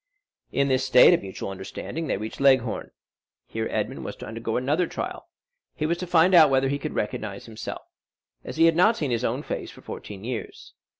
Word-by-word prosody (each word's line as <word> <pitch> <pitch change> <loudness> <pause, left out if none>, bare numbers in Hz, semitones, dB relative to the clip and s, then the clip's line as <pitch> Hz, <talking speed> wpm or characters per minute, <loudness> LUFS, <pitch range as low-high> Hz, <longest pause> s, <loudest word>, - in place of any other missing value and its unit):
In 140 0 +1
this 130 -1 +2
state 130 -1 +7
of - - +2
mutual 95 0 -6
understanding, 125 - -6
they - - 0
reached 110 +6 -6
Leghorn. 130 -4 +3 0.6
Here 110 0 -3
Edmond 110 +5 -3
was 105 - -6
to - - -9
undergo 115 +1 -3
another 150 +8 +1
trial; - - -6 0.5
he 155 - -2
was 170 +2 0
to 180 - -4
find 175 +2 +4
out 160 -4 +8
whether 135 0 +2
he 140 +1 -1
could - - -5
recognize 105 -1 -3
himself, 110 -1 -7 0.6
as - - -7
he 165 - +6
had 165 -1 +4
not 215 +7 +4
seen 145 -5 -2
his 120 0 0
own 125 +5 -1
face - - -4
for - - -14
fourteen 100 -1 -8
years. 120 -1 -6
130 Hz, 200 wpm, -25 LUFS, 110-155 Hz, 0.6 s, out